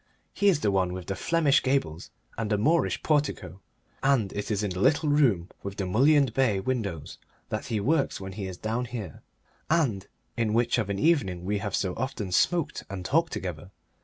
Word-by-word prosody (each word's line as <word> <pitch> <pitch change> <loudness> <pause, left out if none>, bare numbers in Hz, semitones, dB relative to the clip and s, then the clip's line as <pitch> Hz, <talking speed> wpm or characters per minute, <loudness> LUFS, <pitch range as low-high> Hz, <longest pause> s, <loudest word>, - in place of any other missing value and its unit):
His 200 -3 +3
is - - -10
the 105 - +2
one 95 -2 +1
with 90 -1 -6
the 95 - -3
Flemish 160 -1 +2
gables 130 - -1 0.3
and 115 -2 -3
the 105 - +2
Moorish 160 +11 +1
portico, 145 - -1 0.4
and 135 -8 +2
it 105 0 -4
is 105 -1 0
in 100 - -1
the 90 - -4
little 150 +8 +3
room 120 - +3
with 100 0 -6
the 95 - -2
mullioned 135 +5 +3
bay 125 -7 +2
window 100 - -2 0.5
that - - -4
he 110 - -1
works 140 +7 +1
when 95 0 -7
he 95 0 -5
is 95 -1 -7
down 115 +5 -2
here, 115 - -7 0.5
and 130 - +1 0.3
in 110 -2 0
which 120 +1 +2
of 105 -3 -2
an 100 - -1
evening 100 - +1
we 100 +1 0
have 100 -1 -2
so 95 -2 -1
often 110 -7 -3
smoked 170 - +1
and 95 -2 -6
talked 165 - +2
together. 90 -4 -5
110 Hz, 195 wpm, -27 LUFS, 95-140 Hz, 0.5 s, His